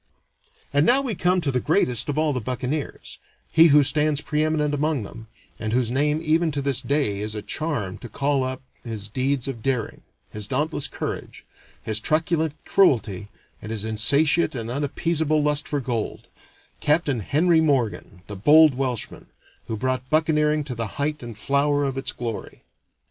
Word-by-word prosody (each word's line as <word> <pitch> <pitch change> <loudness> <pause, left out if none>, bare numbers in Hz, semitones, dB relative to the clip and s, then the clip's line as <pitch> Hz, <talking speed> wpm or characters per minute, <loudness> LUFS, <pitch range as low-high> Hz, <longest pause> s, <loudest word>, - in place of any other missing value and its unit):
And 145 +1 +4
now 245 +9 +5
we 250 -5 -2
come 180 0 +1
to 145 -4 0
the 125 - +1
greatest 135 - +1
of 145 - -2
all 155 -1 +2
the 125 - -2
buccaneers, 130 +5 -4 0.3
he 165 +1 +7
who 145 -1 +6
stands 150 +1 +1
pre 150 +1 -1
eminent 155 -1 0
among 145 -3 0
them, 110 +3 -10 0.3
and 110 -1 -3
whose 120 -2 +1
name 150 +4 +1
even 160 +1 +2
to 140 - -1
this 135 -2 0
day 130 -6 0
is 105 +1 -3
a 105 - -5
charm 125 - -3
to 120 - -9
call 140 +3 0
up 130 0 -4 0.2
his 110 -3 -5
deeds 130 +4 -1
of 125 -5 -5
daring, 125 -2 -2 0.3
his 105 -1 -6
dauntless 150 +1 -1
courage, - - -6 0.4
his 110 -1 0
truculent 160 +3 0
cruelty, 110 - +2 0.3
and 105 - -7
his 110 -1 -3
insatiate 140 +9 +2
and 115 -1 -4
unappeasable 155 +2 0
lust 150 0 +1
for 145 - -1
gold 120 -4 -3 0.5
Capt. 155 +4 +2
Henry 150 - +2
Morgan, 120 - -1
the 105 - -8
bold 150 +9 +6
Welshman, 125 -3 -4 0.4
who 110 - -3
brought 130 +2 -2
buccaneering 155 -1 +2
to 140 -3 -5
the 115 -1 -3
height 150 +1 -1
and 120 -3 -8
flower 145 +4 +1
of 135 -1 -2
its 135 - -3
glory. 115 -3 -6
140 Hz, 170 wpm, -23 LUFS, 120-155 Hz, 0.5 s, he